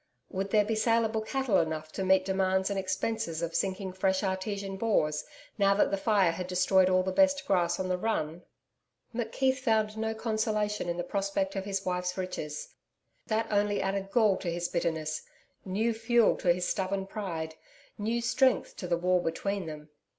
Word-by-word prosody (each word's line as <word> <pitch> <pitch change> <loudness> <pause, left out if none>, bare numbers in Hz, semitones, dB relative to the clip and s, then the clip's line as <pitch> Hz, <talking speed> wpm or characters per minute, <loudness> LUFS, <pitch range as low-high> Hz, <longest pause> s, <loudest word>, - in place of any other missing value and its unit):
Would 195 +1 -2
there 210 0 +4
be 225 - -1
saleable 225 0 +2
cattle 245 -1 +1
enough 155 -1 -2
to 195 - -3
meet 190 0 +4
demands 190 0 +1
and 195 - 0
expenses 185 -3 -2
of 165 0 -2
sinking 190 -1 -1
fresh 190 +1 +1
artesian 195 +1 -2
bores 190 -8 +1 0.4
now 200 0 +4
that 200 - +3
the - - +2
fire 195 -4 +3
had 180 +2 -5
destroyed 185 +1 +3
all 185 0 +3
the 190 - -1
best 280 +6 +3
grass 175 -3 +1
on 190 - -1
the 180 0 -1
run? 175 -6 -1 0.7
McKeith 260 +3 0
found 220 -4 +1
no 225 0 -1
consolation 215 -3 -1
in 170 - -2
the 175 - -1
prospect 195 +1 -1
of 195 -1 -3
his 195 -1 -2
wife's 180 0 -1
riches. 150 -5 -5 0.5
That 220 +1 +1
only 205 0 +2
added 195 0 -2
gall 210 -2 +3
to 175 - -3
his 175 +1 -2
bitterness, 160 -3 -1 0.4
new 215 +5 0
fuel 225 0 +3
to 175 - +3
his 180 +1 0
stubborn 195 0 -1
pride, 170 -6 -4 0.5
new 230 +3 -1
strength 260 +2 +2
to 180 - -5
the 170 -1 +1
wall 180 +1 +2
between 185 +2 -2
them. 150 -1 -8
195 Hz, 180 wpm, -29 LUFS, 180-215 Hz, 0.7 s, there